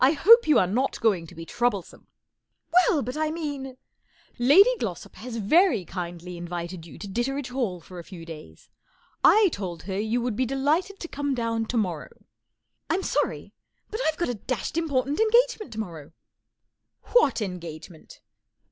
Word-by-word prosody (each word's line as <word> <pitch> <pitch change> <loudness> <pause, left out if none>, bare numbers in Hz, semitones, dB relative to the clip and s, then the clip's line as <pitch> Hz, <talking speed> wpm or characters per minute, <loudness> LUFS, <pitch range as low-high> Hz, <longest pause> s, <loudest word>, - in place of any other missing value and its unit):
X 280 +3 +3
hope 465 +2 +8
you 300 -5 +5
are 185 - +4
not 245 +9 -1
going 190 -7 +1
to - - -14
be 165 +1 -8
trou 240 +8 +1
blesome," 200 -6 -9 0.3
" 320 - -43
Well, 345 -4 +4
but 250 +3 -5
I 310 0 0
mean 285 -5 -5 0.2
" - - -39
" - - -33
Lady 400 +10 +7
GIossop 180 -5 -5
has 235 +1 -7
very 235 - +3
kindly 175 0 -6
invited 170 0 -6
you 145 - -12
to 205 - -7
Ditteredge 250 +6 -2
Hall 235 -9 -2
for 180 +1 -11
a - - -8
few 170 -2 -11
days. 155 - -12 0.5
1 400 +1 +6
told 180 - -5
her 190 +1 -3
you 220 +3 0
would 240 -2 -2
be 255 +3 0
delighted 310 - 0
to 340 - -5
come 285 -3 -2
down 230 -2 -1
tomorrow." 190 -10 -3 0.7
I'm 385 - 0
sorry, - - -1 0.4
but 435 +3 -3
I've 315 - 0
got 345 - -1
a - - 0
dashed 225 0 -4
impor¬ 310 -6 0
tant 285 +3 -3
engagement 450 - +3
to 220 - -6
morrow," 165 -7 -7 1.0
What 470 - +4
engagement 170 -4 -8
240 Hz, 180 wpm, -26 LUFS, -, 1.0 s, hope